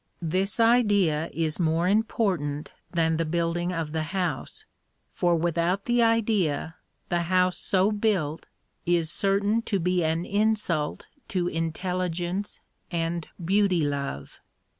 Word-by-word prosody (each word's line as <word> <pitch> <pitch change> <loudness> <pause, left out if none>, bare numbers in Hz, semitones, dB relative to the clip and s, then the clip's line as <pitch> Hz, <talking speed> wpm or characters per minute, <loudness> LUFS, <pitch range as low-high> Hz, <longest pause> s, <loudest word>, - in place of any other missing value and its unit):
This 190 +7 -1
idea 205 -9 +3
is 160 -1 -1
more 165 +1 +2
important 190 -8 0 0.2
than 165 -2 +1
the 165 - +1
building 170 +2 -1
of 165 -3 -3
the 160 0 -1 0.2
house, 175 -8 -3 0.5
for 175 -1 +2
without 170 +3 0
the 240 0 +2
idea 210 -10 +1 0.4
the 175 0 +1
house 185 -1 +2
so 195 +2 +2
built 200 -8 -1 0.4
is 170 -2 +2
certain 200 +3 +2
to 200 - +1
be 180 0 +1
an 160 +2 0
insult 205 -7 0 0.2
to 180 -3 -1
intelligence 180 +3 -2 0.3
and 170 -1 -2 0.2
beauty 195 -2 +3
love. 140 - -4
175 Hz, 120 wpm, -26 LUFS, 165-200 Hz, 0.5 s, idea